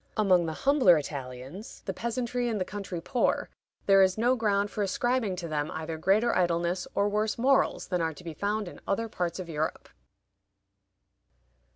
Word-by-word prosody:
Among 185 -5 +4
the 160 - -2
humbler 260 - +5
Italians, 140 - -7
the 190 - -2
peasantry 240 +3 -2
and 220 -3 -1
the 185 - -1
country 195 -3 -5
poor, 250 +7 0 0.3
there 195 -1 +6
is 190 0 +3
no 240 +3 +3
ground 205 -3 +1
for 210 - -3
ascribing 225 +1 0
to 175 -2 -5
them 150 -1 -2
either 160 0 -4
greater 215 +7 +3
idleness 175 0 0
or 200 - +2
worse 210 +1 0
morals 265 +3 +2
than 180 -2 0
are 160 -1 -1
to 180 - -13
be 165 -2 -6
found 205 +5 -2
in - - -10
other 225 +3 0
parts 175 -5 -3
of 185 -2 -6
Europe. 155 -1 -3
195 Hz, 175 wpm, -28 LUFS, 170-220 Hz, 0.3 s, there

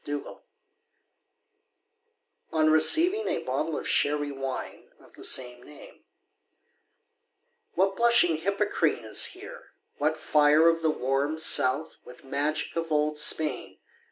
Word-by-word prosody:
DON 145 0 -5
QUIXOTE - - -14 2.1
On 155 -1 +2
receiving 325 - +4
a - - -3
bottle - - -4
of - - -6
Sherry 145 0 0
Wine 135 -1 -8
of - - -22
the - - -14
same 125 -1 0
name 145 +3 -16 1.7
What 195 +2 0
"blushing 235 -9 +3
Hippocrene" 175 - -2
is 110 - +3
here! - - -13 0.3
what 155 +2 -1
fire 150 +1 +2
Of 165 0 +1
the 160 - 0
"warm 140 +2 -2
South" 155 -1 +1
with 125 - -16
magic 145 +3 -3
of 165 -1 -5
old 150 0 -1
Spain! 150 -10 +1
155 Hz, 125 wpm, -25 LUFS, 140-165 Hz, 2.1 s, receiving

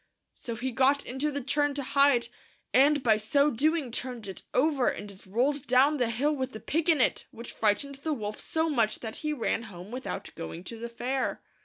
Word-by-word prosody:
So 235 - -6
he 255 +3 -3
got 270 +3 +3
into 265 +4 -1
the 285 -1 -3
churn 290 +1 +1
to 285 - -2
hide, 275 -3 +3 0.5
and 285 +2 +5
by 220 -3 +4
so 280 +7 +3
doing 300 +1 +1
turned 245 -3 -3
it 190 - -7
over, 275 -1 +2
and 205 0 -2
it 190 -1 -15
rolled 255 +7 0
down 265 +5 +4
the 245 -3 +1
hill 280 +7 +1
with 260 -2 -3
the 220 - -6
pig 325 +7 -1
in 320 -4 +5
it, - - +1
which 235 +1 -9
frightened 250 +6 0
the 315 - -2
wolf 215 -7 -3
so 320 0 0
much 230 -8 +1
that 220 -2 -6
he 305 - -2
ran 250 -5 0
home 180 +2 -10
without 255 +1 -5
going 165 +1 -7
to 225 +5 -8
the 235 +1 -5
fair. 255 +3 -2
260 Hz, 210 wpm, -28 LUFS, 230-285 Hz, 0.5 s, and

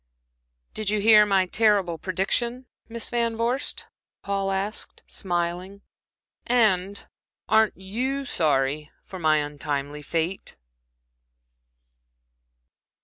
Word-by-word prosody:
"Did 215 -2 -1
you 210 0 +1
hear 210 0 +7
's 190 -2 +3
terrible 200 -7 +2
prediction, 235 +7 -1 0.2
Miss 230 -1 -2
Van 235 -1 0
Vorst?" 235 +4 -2 0.4
Paul 195 -1 -1
asked, 195 +2 -3
smiling, 180 +2 -3 0.6
"and 200 -5 +2 0.4
aren't 220 -1 +3
you 250 +9 -3
sorry 150 - +1
for 190 - -9
my 155 -2 +3
untimely 145 0 -3
fate?" 165 +5 -3
195 Hz, 90 wpm, -25 LUFS, 170-220 Hz, 0.6 s, hear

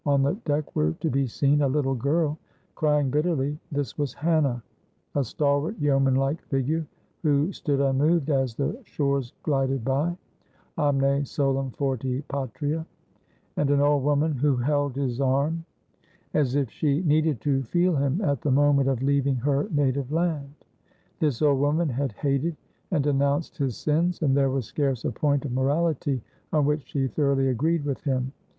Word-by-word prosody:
On 140 -1 +3
the 140 - +2
deck 150 0 -1
were 75 +1 +2
to 160 - -3
be 135 +1 +1
seen 140 +5 +2
a 140 - +3
little 135 0 +1
girl 150 +4 0 0.3
crying 150 -3 +1
bitterly 150 -1 0
this 145 0 -3
was 145 -2 -2
Hannah 145 -7 +1 0.5
a 140 - +1
stalwart, 145 - 0
yeoman 135 -3 +2
like 135 +4 0
figure, 150 +4 -1 0.3
who 150 +2 +2
stood 145 -7 -1
unmoved 140 +3 +2
as 135 -4 0
the 140 - -2
shores 140 - -1
glided 135 -4 0
by, 150 +6 0 0.6
Omne 140 -1 +2
solum 135 -2 -1
forti 130 0 -2
patria, 145 +4 -2 0.7
and 145 - +1
an 145 0 +3
old 145 0 +3
woman 145 +2 +2
who 140 +1 +2
held 145 +1 0
his 135 -2 -2
arm 140 +5 +1 0.7
as 140 -4 +1
if 140 -5 0
she 150 +1 0
needed 155 -4 +2
to 135 0 +1
feel 175 +7 +1
him 140 +6 0
at 140 - 0
the 150 - -1
moment 140 0 +4
of 130 -1 -1
leaving 140 -1 +2
her 140 +3 0
native 140 -2 0
land. 155 -4 -1 0.6
This 150 -3 0
old 140 -3 +4
woman 150 +3 +1
had 135 -1 -2
hated 140 +7 -1 0.3
and 160 -7 +1
denounced 140 +3 0
his 135 -8 -2
sins, 170 +4 0
and 135 -3 +3
there 135 -1 +3
was 130 -2 -1
scarce 135 -1 -1
a - - 0
point 145 -2 0
of 135 - -3
morality 140 -1 0 0.3
on 150 -2 +2
which 150 -1 -1
she 135 -2 -1
thoroughly 140 -1 +1
agreed 150 +5 0
with 140 -2 -2
him. 130 -2 -1
140 Hz, 165 wpm, -25 LUFS, 135-150 Hz, 0.7 s, moment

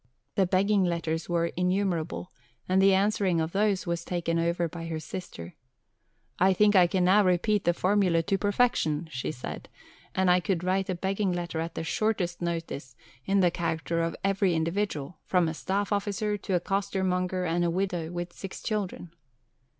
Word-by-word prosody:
The 190 -2 +2
begging 195 +2 +3
letters 165 -2 -1
were 170 -1 +1
innumerable, 180 -2 -1 0.4
and 185 +1 +3
the 195 0 +6
answering 195 -3 +2
of 160 +1 -1
these 200 0 +1
was 170 -1 -2
taken 170 -2 -1
over 170 +1 +1
by 165 0 -7
her 160 -1 -3
sister. 155 - -7 0.9
"I 190 +1 +5
think 210 +2 +4
I 180 -2 +7
can 180 0 +1
now 200 +3 +5
repeat 190 +3 +2
the 175 - +4
formula 185 -4 +2
to 195 +3 0
perfection," 200 -7 +1
she 130 - -3
said, 125 - -7 0.5
"and 185 -1 +3
I 180 - +5
could 180 -1 -1
write 190 +1 0
a 185 - 0
begging 195 +2 -1
letter 175 -2 -3
at 165 +1 -4
the - - -3
shortest 180 -2 -1
notice 165 -7 -4 0.3
in 195 0 +3
the 175 -2 +4
character 165 0 -1
of 165 -1 -1
every 195 -2 +2
individual, 165 -2 -2
from 180 -3 +2
a 160 - -2
staff 195 +5 -2
officer 205 +1 -1
to 195 -2 -2
a - - +3
costermonger, 185 -1 -1
and 175 +1 +1
a 170 - +2
widow 175 -2 -2
with 175 0 -5
six 195 - -8
children." 195 -6 -3
180 Hz, 175 wpm, -28 LUFS, 170-195 Hz, 0.9 s, I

